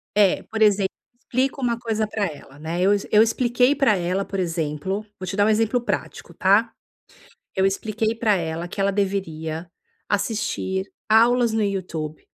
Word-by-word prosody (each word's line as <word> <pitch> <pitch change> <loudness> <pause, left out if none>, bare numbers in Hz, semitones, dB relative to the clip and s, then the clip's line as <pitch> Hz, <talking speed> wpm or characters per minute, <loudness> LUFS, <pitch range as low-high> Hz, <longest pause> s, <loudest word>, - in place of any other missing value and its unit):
é, 205 -3 +4
por 220 0 -5
exemplo, 200 -2 +4 0.3
explico 265 +2 -1
uma 235 -2 0
coisa 220 -2 -1
para 210 -1 -1
ela, 145 -4 -9
né. 165 +3 -3
Eu 200 +2 +4
ex 200 - -2
eu 210 - +7
expliquei 245 +3 +3
para 250 -8 +3
ela, 180 +2 -1
por 195 - -4
exemplo, 170 +4 -2
vou 185 - -6
te 195 - -3
dar 205 0 +3
um 220 - +3
exemplo 225 +3 +2
prático, - - -4
tá? - - +3 0.8
Eu 190 0 +3
expliquei 215 +3 -1
para 220 -2 +2
ela 165 0 -3
que 195 - -6
ela 200 0 +3
deveria 170 -5 -2 0.4
assistir 200 -2 -1 0.2
aulas 235 +1 +4
no 220 -1 +1
YouTube 170 -6 -3
200 Hz, 170 wpm, -23 LUFS, 180-220 Hz, 0.8 s, eu